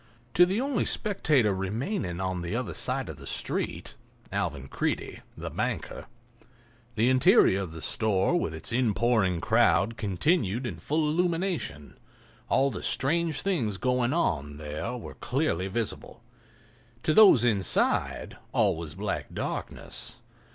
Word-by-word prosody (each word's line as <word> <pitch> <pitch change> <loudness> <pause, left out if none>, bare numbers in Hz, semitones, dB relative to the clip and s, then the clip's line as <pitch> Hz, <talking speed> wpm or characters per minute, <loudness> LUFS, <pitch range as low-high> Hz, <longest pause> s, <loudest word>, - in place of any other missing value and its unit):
To 175 +1 +6
the 195 +4 0
only 265 -3 0
spectator 150 - +3
remaining 95 - -3
on 95 -2 -2
the 85 0 -3
other - - -3
side - - 0
of - - -7
the - - -10
street—Alvan 70 -1 -4
Creede, - - -3 0.2
the - - -6
banker—the 120 -1 -5
interior 130 - +5
of 90 -4 -5
the 80 -1 -6
store 105 - +1
with 170 - 0
its 80 - -3
inpouring 110 -5 +2
crowd 115 +3 +3
continued 110 - 0
in 100 -9 -4
full 155 - 0
illumination; 170 - -2 0.5
all 135 +1 +3
the - - -6
strange 160 +3 0
things 125 - 0
going 125 +1 +1
on 75 - -1
there 75 +11 -5
were 120 - -9
clearly 125 - -1
visible. 115 +2 -4 0.8
To 155 - +2
those 190 - +7
inside 100 -6 +1
all - - +2
was 80 -2 -7
black 100 +1 -4
darkness. - - -5
120 Hz, 130 wpm, -27 LUFS, 95-155 Hz, 0.8 s, those